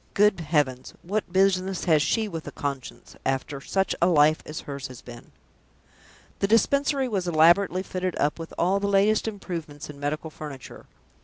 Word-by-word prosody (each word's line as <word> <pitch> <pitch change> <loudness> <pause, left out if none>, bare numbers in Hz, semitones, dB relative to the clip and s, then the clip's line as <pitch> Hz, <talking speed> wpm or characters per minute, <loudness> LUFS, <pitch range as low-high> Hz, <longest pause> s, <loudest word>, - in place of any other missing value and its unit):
"Good 210 -2 +4
heavens, 145 -5 -1
what 200 +1 -2
business 190 0 +2
has 160 -4 +4
she 220 +8 +1
with 165 -5 -6
a - - -5
conscience, 140 -3 -6
after 135 +1 -2
such 190 +6 0
a 170 - +5
life 155 -2 +4
as 155 - -6
hers 140 -2 -6
has 130 -2 -11
been!" 120 -1 -12 1.1
The 200 - +1
Dispensary 275 +5 +2
was 195 -6 -2
elaborately 175 +3 +4
fitted 185 -1 -3
up 150 +3 0
with 165 - -7
all 190 +3 +2
the 200 - -1
latest 200 +2 +3
improvements 165 -9 -6
in 140 - -14
medical 155 +2 -3
furniture. 145 -4 -10
170 Hz, 165 wpm, -25 LUFS, 145-195 Hz, 1.1 s, a